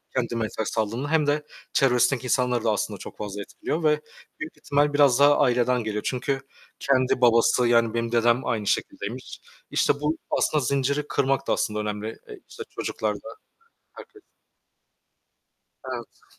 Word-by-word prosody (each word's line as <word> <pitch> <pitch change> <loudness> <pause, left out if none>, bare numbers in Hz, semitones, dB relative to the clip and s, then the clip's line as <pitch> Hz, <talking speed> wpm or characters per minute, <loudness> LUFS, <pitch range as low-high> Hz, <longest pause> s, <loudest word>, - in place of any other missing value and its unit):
kendine 115 -3 -1
ters 110 - -1
kaldığında, 115 +6 -1
hem 155 -2 +3
de 150 +1 +1 0.3
çevresindeki 125 -1 +3
insanları 125 -2 +1
da 110 - +2
aslında 105 - -2
çok - - -10
fazla 105 -1 -5
etkiliyor 160 +10 -4
ve 150 -1 +3 0.4
büyük 155 +1 -7
ihtimal 145 -1 +1
biraz 140 -3 +5
daha 145 +1 +6
aileden 125 -2 +2
geliyor 105 -1 -3
çünkü 135 +2 -1 0.4
kendi 130 -2 +1
babası, 120 +1 +4
yani 115 -1 +3
benim 115 0 -1
dedem 120 +1 +2
aynı 105 -3 -1
şekildeymiş. 120 +6 -3 0.3
İşte - - +3
bu 150 +2 0
aslında 150 - +1
zinciri 140 +2 0
kırmak 135 0 0
da - - +2
aslında 105 0 -1
önemli 105 +1 -4 0.3
işte 450 - -8
çocuklar - - -2
da - - -10 0.6
herkes. 415 - -14 1.7
Evet. - - -10
125 Hz, 145 wpm, -25 LUFS, 115-145 Hz, 1.7 s, daha